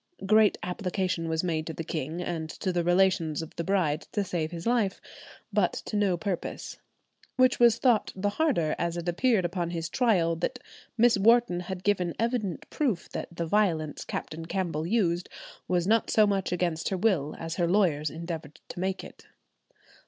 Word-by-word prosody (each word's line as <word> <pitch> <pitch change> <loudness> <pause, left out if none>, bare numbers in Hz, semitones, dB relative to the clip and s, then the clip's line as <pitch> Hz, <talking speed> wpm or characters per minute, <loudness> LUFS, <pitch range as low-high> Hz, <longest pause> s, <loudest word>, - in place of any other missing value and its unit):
"Great 215 +1 +5
application 180 -2 -2
was 160 +1 0
made 160 -3 -1
to 160 - -4
the 165 - -5
king 160 +1 -4
and 160 -3 -3
to 185 +3 -3
the 175 -1 +1
relations 175 -3 +2
of 160 - -11
the 170 - -3
bride 170 -5 +1
to 205 - 0
save 175 -4 -2
his 170 -1 -7
life," 230 -5 +1 0.5
but - - +2
to - - -6
no 200 -4 +2
purpose, 180 -1 -4 0.6
"which 255 -1 +4
was 235 -2 +6
thought 240 -5 +2
the 195 +2 0
harder, 205 - +1
as 170 0 -1
it 170 0 -5
appeared 195 +2 +2
upon 175 0 -2
his 170 -1 -3
trial 185 -10 +2
that 175 +10 -2 0.4
Miss 235 -2 +5
Wharton 230 -3 +4
had 180 +1 -6
given 185 -4 +1
evident 225 -6 -2
proof 245 - -1
that - - -5
the 170 0 -3
violence 165 -5 0
Captain 165 +1 -5
Campbell 165 -4 -2
used 180 -5 +1 0.4
was 175 -1 +1
not 225 +3 +2
so 215 - +5
much 195 -4 0
against 170 -2 -1
her 190 - -1
will 180 -8 +1
as 165 +1 -5
her 175 -2 +2
lawyers 170 -6 +2
endeavoured 160 -2 -7
to - - -7
make 190 +1 -2
it." - - -13
180 Hz, 180 wpm, -28 LUFS, 165-205 Hz, 0.6 s, was